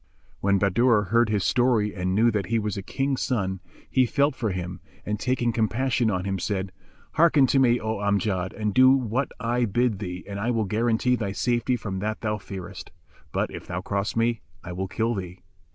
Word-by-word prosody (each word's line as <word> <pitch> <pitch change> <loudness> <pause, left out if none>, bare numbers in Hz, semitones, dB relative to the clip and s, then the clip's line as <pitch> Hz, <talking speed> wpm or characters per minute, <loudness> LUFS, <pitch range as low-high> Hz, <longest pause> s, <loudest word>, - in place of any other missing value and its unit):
[FN#390] - - -36
When 100 0 +3
Bahadur 105 +3 +3
heard 115 -1 +3
his 105 -3 +1
story 120 -4 +2
and 95 0 -1
knew 115 +3 +4
that 105 -2 -2
he 115 - +1
was 105 -2 -2
a 100 - -4
King's 135 +6 -2
son, 95 -7 -1 0.3
he 130 -1 +2
felt 140 +3 +2
for 115 -4 -1
him 90 -1 -5 0.2
and, 105 0 -2
taking 120 -1 0
compassion 120 +2 +1
on 90 -2 -1
him, 95 -1 -2
said, 95 0 -2 0.4
"Hearken 155 -4 +5
to 135 +1 +2
me, 120 -2 +4
O 110 0 -2
Amjad, 100 -2 0
and 105 -2 -2
do 130 +3 +7
what 130 0 +1
I 120 0 +1
bid 115 0 0
thee 90 -3 -5
and 100 0 -5
I 110 +4 -1
will 115 -3 +1
guarantee 115 +4 +1
thy 100 -5 -3
safety 120 +2 0
from 100 -5 -4
that 110 +2 -3
thou 105 -1 -1
fearest; 95 -1 -8 0.4
but, - - -1
if - - -9
thou 90 0 -3
cross 100 +2 -2
me, 115 -1 +1 0.2
I 90 - -7
will 95 +2 -3
kill 115 +4 -1
thee." 90 -3 -6
110 Hz, 205 wpm, -25 LUFS, 100-120 Hz, 0.4 s, do